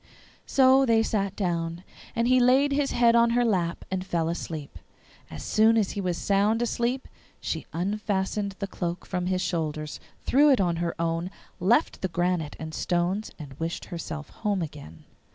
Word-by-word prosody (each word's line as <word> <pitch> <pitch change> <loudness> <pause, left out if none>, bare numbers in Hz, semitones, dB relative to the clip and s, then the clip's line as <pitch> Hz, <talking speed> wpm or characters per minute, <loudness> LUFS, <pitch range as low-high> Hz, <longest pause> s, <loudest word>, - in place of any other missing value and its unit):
So 265 0 +5
they 225 -3 +4
sat 200 -3 -1
down, 170 -2 -2 0.3
and 230 +1 +1
he 255 0 +5
laid 260 +3 +4
his 280 0 +1
head 235 -1 +4
on 235 0 +5
her 245 - +3
lap 180 -6 0
and 190 -1 -1
fell 170 -3 -1
asleep. 160 -4 -5 0.5
As 75 - -8
soon 220 +1 +4
as 210 -4 +1
he 205 - -3
was 180 -2 -1
sound 205 +4 +2
asleep 240 +2 -1 0.3
she - - -4
unfastened 200 +2 -2
the 200 - -3
cloak 175 -2 -4
from 180 -1 -2
his 185 0 0
shoulders, 155 -3 -3 0.3
threw 290 +3 +5
it 270 - +5
on 175 -3 +1
her 170 0 -3
own, 165 +1 -1 0.3
left 235 - +2
the 190 - 0
granite 175 -3 -1
and 160 0 -7
stones, 180 +6 -1
and 145 -4 -9
wished 165 +1 -3
herself 155 -2 -6
home 205 -5 -1
again. 140 - -9
190 Hz, 170 wpm, -26 LUFS, 170-225 Hz, 0.5 s, So